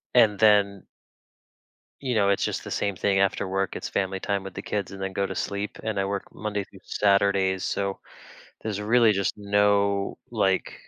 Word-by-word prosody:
And 110 Hz, -4 st, +5 dB
then 100 Hz, -2 st, +4 dB, 1.2 s
you 130 Hz, -3 st, -1 dB
know, 100 Hz, -3 st, +3 dB
it's 100 Hz, -, +2 dB
just -, -, -3 dB
the -, -, -7 dB
same 100 Hz, -2 st, -1 dB
thing 95 Hz, +1 st, +1 dB
after 100 Hz, 0 st, +1 dB
work, 95 Hz, 0 st, -1 dB
it's -, -, -5 dB
family 95 Hz, -1 st, -1 dB
time 100 Hz, 0 st, -2 dB
with 95 Hz, -1 st, -8 dB
the 95 Hz, -, -6 dB
kids 100 Hz, -2 st, -3 dB
and 95 Hz, 0 st, -8 dB
then 95 Hz, 0 st, -3 dB
go 100 Hz, -, 0 dB
to -, -, -4 dB
sleep, 100 Hz, +1 st, -3 dB
and 110 Hz, -3 st, -2 dB
I 95 Hz, -, +1 dB
work 100 Hz, 0 st, -3 dB
Monday 105 Hz, -2 st, -3 dB
through 95 Hz, -, -17 dB
Saturdays 100 Hz, -2 st, +2 dB
so, 100 Hz, -1 st, -2 dB, 0.6 s
there's 105 Hz, -2 st, -3 dB
really 115 Hz, +1 st, +4 dB
just 100 Hz, -1 st, 0 dB
no, 100 Hz, -1 st, +2 dB
like 95 Hz, -4 st, +1 dB
100 Hz, 190 wpm, -26 LUFS, 95-105 Hz, 1.2 s, And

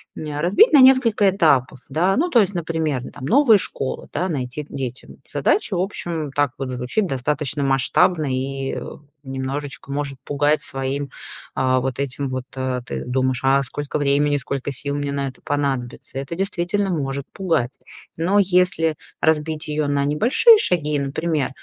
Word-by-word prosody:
м, 150 Hz, -2 st, -5 dB
а, -, -, -2 dB
разбить 200 Hz, -, +5 dB
на 295 Hz, -, +7 dB
несколько 245 Hz, -6 st, +5 dB
этапов, 140 Hz, -9 st, +2 dB
да, 175 Hz, +7 st, +2 dB
ну, 335 Hz, +7 st, +1 dB
то 245 Hz, -, +4 dB
есть, 200 Hz, -2 st, +2 dB
например: 160 Hz, -5 st, -1 dB
ну, -, -, -8 dB
там, 130 Hz, -, -9 dB
новые 235 Hz, -, +5 dB
школы, 135 Hz, -8 st, -4 dB
да, 180 Hz, +5 st, -1 dB
найти 135 Hz, -1 st, -3 dB
к 150 Hz, -, -20 dB
детям. 130 Hz, -3 st, -6 dB
Задача, 220 Hz, -, +1 dB
в 175 Hz, -, +1 dB
общем, 165 Hz, -6 st, -3 dB
так 145 Hz, -1 st, +1 dB
вот 135 Hz, -1 st, -4 dB
звучит- 125 Hz, -, -1 dB
достаточно 145 Hz, 0 st, -2 dB
масштабно 150 Hz, +5 st, +2 dB
и, 135 Hz, +1 st, -3 dB
э, -, -, -4 dB, 0.4 s
немножечко 135 Hz, +1 st, -5 dB
может 140 Hz, -1 st, -3 dB
пугать 145 Hz, +1 st, +1 dB
своим, 135 Hz, +1 st, -4 dB, 0.5 s
а, 130 Hz, 0 st, +2 dB
вот 130 Hz, +1 st, -3 dB
этим 140 Hz, 0 st, -2 dB
вот. 130 Hz, -1 st, -4 dB
А, 130 Hz, -1 st, -2 dB
ты 120 Hz, -, -5 dB
думаешь: 130 Hz, 0 st, 0 dB
а 135 Hz, +1 st, +4 dB
сколько 145 Hz, +2 st, -4 dB
времени, 145 Hz, 0 st, +2 dB
сколько 140 Hz, +1 st, -4 dB
сил 140 Hz, +2 st, -4 dB
мне 145 Hz, -1 st, -2 dB
на 140 Hz, -1 st, -2 dB
это 130 Hz, -, -16 dB
понадобится? 135 Hz, -3 st, -3 dB
Это 140 Hz, +5 st, -5 dB
действительно 195 Hz, +1 st, -1 dB
может 140 Hz, -5 st, -2 dB
пугать. 160 Hz, -10 st, -1 dB, 0.4 s
Но 180 Hz, +5 st, +1 dB
если 180 Hz, -4 st, +2 dB, 0.3 s
разбить 160 Hz, 0 st, 0 dB
ее 150 Hz, -1 st, -1 dB
на 145 Hz, -1 st, +1 dB
небольшие 240 Hz, -, +5 dB
шаги, 150 Hz, -, 0 dB
например, 150 Hz, +1 st, -1 dB
145 Hz, 170 wpm, -21 LUFS, 135-170 Hz, 0.5 s, на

